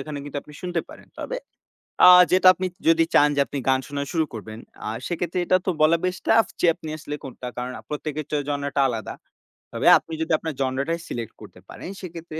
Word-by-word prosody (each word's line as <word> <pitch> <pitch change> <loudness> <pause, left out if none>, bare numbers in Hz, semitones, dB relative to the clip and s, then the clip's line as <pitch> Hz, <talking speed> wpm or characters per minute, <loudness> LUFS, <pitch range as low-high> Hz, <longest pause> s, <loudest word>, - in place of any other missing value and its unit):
এখানে 150 -2 -6
কিন্তু 145 - -7
আপনি 150 - -15
শুনতে 175 -2 -1
পারেন। - - -14
তবে - - -4 0.7
আ - - +11 0.2
যেটা 185 0 +5
আপনি 185 0 -3 0.2
যদি 165 0 +5
চান 145 - +6
যে - - 0
আপনি 145 - -5
গান 130 0 +4
শোনা 140 0 -3
শুরু 160 -2 +1
করবেন 110 0 -8 0.3
আ - - -3 0.2
সেক্ষেত্রে 175 +1 -2
এটা 185 - +4
তো - - 0
বলা 160 +2 +5
বেশ 185 0 -1
টাফ 225 0 +5 0.2
যে - - +4
আপনি 160 - -9
আসলে 145 0 -6
কোনটা 130 -1 -8
কারণ 125 +1 -3 0.2
প্রত্যেকের 150 0 -4 0.2
জনরাটা 140 -1 -1
আলাদা। 115 -4 -4 0.6
তবে - - 0
আপনি 165 - -11
যদি 160 - -2
আপনার 160 -1 -5
জনরাটাই 135 +6 -1
সিলেক্ট 115 -2 -5
করতে 100 -3 -13
পারেন, - - -9
সেক্ষেত্রে 165 -2 -8
155 Hz, 200 wpm, -23 LUFS, 135-170 Hz, 0.7 s, আ